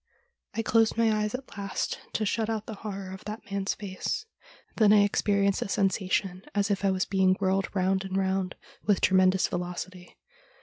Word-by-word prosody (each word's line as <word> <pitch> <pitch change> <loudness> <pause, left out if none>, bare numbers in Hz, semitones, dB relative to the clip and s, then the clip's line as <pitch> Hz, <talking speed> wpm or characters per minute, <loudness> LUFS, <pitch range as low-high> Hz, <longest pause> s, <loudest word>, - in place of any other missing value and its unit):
I 225 - 0
closed 225 0 +3
my 230 -1 +4
eyes 210 +2 -1
at 260 +1 -9
last 200 -1 -2
to 215 - 0
shut 220 +2 0
out 220 -1 -2
the 225 - -6
horror 195 -3 -5
of 190 - -9
that 210 -1 -7
man's 200 0 -1
face; 200 - -4 0.5
then 215 -3 +6
I 210 -1 +7
experienced 200 -1 +2
a - - 0
sensa 195 -1 0
tion 185 -2 0
as 205 0 +1
if 200 0 -1
I 195 - +4
was 185 -1 +1
being 190 -1 +3
whirled 190 0 +1
round 190 0 +1
and 190 0 -3
round 190 -1 0 0.3
with 205 -2 +3
tremen 185 0 +5
dous 190 0 +2
velocity. 180 0 -6
195 Hz, 190 wpm, -28 LUFS, 190-210 Hz, 0.5 s, I